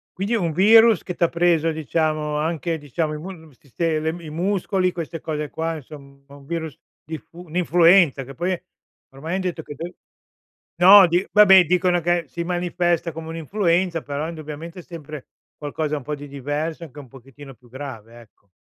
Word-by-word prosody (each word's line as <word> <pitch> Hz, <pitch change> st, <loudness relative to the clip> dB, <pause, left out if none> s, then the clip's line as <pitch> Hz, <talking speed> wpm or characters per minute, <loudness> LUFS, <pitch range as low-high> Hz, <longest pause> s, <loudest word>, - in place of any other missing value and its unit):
Quindi 200 Hz, +5 st, -2 dB
è -, -, +3 dB
un 170 Hz, -6 st, -1 dB
virus 220 Hz, +4 st, +6 dB
che 180 Hz, -, -5 dB
t'ha 170 Hz, -1 st, +1 dB
preso, 170 Hz, -2 st, +2 dB
diciamo, 155 Hz, -1 st, -1 dB
anche, 165 Hz, +2 st, -2 dB
diciamo, 150 Hz, +2 st, -3 dB
i 150 Hz, -, -5 dB
musc 180 Hz, +1 st, -8 dB
il 130 Hz, -, -24 dB
siste 155 Hz, +3 st, -2 dB
le 160 Hz, -, -1 dB
i 155 Hz, -, -8 dB
muscoli, 185 Hz, +2 st, 0 dB
queste 165 Hz, -2 st, -6 dB
cose 150 Hz, -2 st, -4 dB
qua, 165 Hz, 0 st, -3 dB
insom 140 Hz, -2 st, -13 dB
un 140 Hz, -1 st, -15 dB
virus 160 Hz, -3 st, -4 dB, 0.3 s
diffu 165 Hz, +2 st, -9 dB
un'influenza, 170 Hz, -3 st, +4 dB
che 135 Hz, +2 st, -11 dB
poi, 175 Hz, +5 st, -2 dB, 0.5 s
ormai 160 Hz, +7 st, -5 dB
han 190 Hz, -, -1 dB
detto 180 Hz, -3 st, -3 dB
che 145 Hz, -, -10 dB
de 170 Hz, +5 st, -7 dB, 0.9 s
No 190 Hz, +1 st, +9 dB
di, 175 Hz, +3 st, 0 dB
vabbè, 190 Hz, -3 st, +7 dB
dicono 180 Hz, +1 st, +2 dB
che 175 Hz, 0 st, 0 dB
si 170 Hz, +6 st, -5 dB
manifesta 175 Hz, -1 st, -1 dB
come 160 Hz, 0 st, -8 dB
un'influenza, 170 Hz, +1 st, 0 dB
però, 145 Hz, +2 st, -4 dB
indubbiamente, 160 Hz, +2 st, -8 dB
è -, -, -10 dB
sempre 155 Hz, -5 st, -9 dB, 0.3 s
qualcosa 150 Hz, +1 st, -3 dB
un 140 Hz, -, -8 dB
po' 150 Hz, +3 st, -4 dB
di 145 Hz, 0 st, -10 dB
diverso, 145 Hz, +4 st, -4 dB
anche 150 Hz, -2 st, -11 dB
un 140 Hz, -, -11 dB
pochettino 135 Hz, +2 st, -14 dB
più 120 Hz, 0 st, -23 dB
grave, 120 Hz, -3 st, -9 dB
ecco. 105 Hz, -3 st, -24 dB
160 Hz, 180 wpm, -22 LUFS, 145-175 Hz, 0.9 s, No